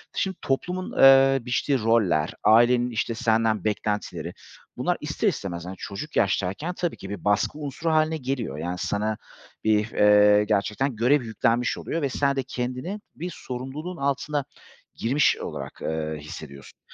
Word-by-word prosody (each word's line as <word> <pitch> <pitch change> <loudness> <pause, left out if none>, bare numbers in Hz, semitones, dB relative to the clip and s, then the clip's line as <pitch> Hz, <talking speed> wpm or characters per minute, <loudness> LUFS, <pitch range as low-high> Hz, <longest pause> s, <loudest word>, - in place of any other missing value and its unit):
Şimdi 190 -2 -1
toplumun, 180 +7 -2
ııı, 135 -1 +6
biçtiği 130 +2 +1
roller, 105 -9 +2
ailenin 120 +3 +5
işte 115 0 -2
senden 110 -3 +1
beklentileri, 105 0 -2 0.4
bunlar - - 0
ister - - -1
istemez, 85 -3 -2
hani, 95 +1 -6
çocuk 145 +13 -7
yaştayken, 100 - 0
tabii 175 -2 -3
ki 95 - -9
bir 100 -3 -6
baskı 105 +8 +1
unsuru 150 +3 -3
hâline 155 0 +2
geliyor. 130 - -3
Yani, 90 +3 -3
sana 105 +3 -1 0.5
bir, 110 0 +2
eee, 105 0 +5
gerçekten 105 +5 0
görev 125 +5 +3
yüklenmiş 115 +2 0
oluyor 165 - -3
ve 140 - 0
sen 140 +1 +1
de 135 - -1
kendini 130 - -4 0.2
bir 175 +3 -5
sorumluluğun 135 +8 -6
altına 140 0 -1 0.5
girmiş 135 +6 +2
olarak, - - -7
ııı, 80 -1 -2
hissediyorsun. 75 -2 -10
120 Hz, 145 wpm, -25 LUFS, 105-140 Hz, 0.5 s, ııı